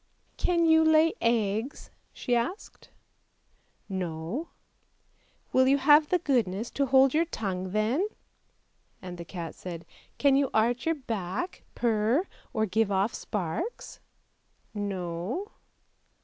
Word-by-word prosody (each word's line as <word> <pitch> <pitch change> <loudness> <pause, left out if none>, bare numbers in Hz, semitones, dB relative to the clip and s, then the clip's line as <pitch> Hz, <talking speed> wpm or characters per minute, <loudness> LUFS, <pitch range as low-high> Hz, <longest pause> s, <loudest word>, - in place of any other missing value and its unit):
" - - -40
Can 340 -2 +3
you 320 0 +6
lay 315 +1 +5
eggs? 230 +2 -1
" - - -42
she 245 - -1
asked. 250 - -4 1.0
"No! 180 - -4 0.3
" - - -43
" - - -38
Will 260 0 +5
you 275 +1 +5
have 295 +2 +5
the 365 - +3
goodness 235 - 0
to 280 -1 0
hold 265 0 +5
your 325 +2 +3
tongue 190 - -4
then! 225 - +1 0.5
" - - -42
And 180 -1 -7
the 170 - -6
cat 165 -3 -6
said, 170 -2 -8 0.2
" - - -32
Can 280 -1 +4
you 275 -1 +2
arch 240 +6 +2
your 330 - +2
back, 225 - -4
purr, 230 - +1 0.3
or 220 -1 0
give 220 +1 +1
off 195 +3 +1
sparks? 210 - -4 0.2
" - - -45
" - - -40
No." 200 - -4
235 Hz, 150 wpm, -28 LUFS, 190-290 Hz, 1.0 s, you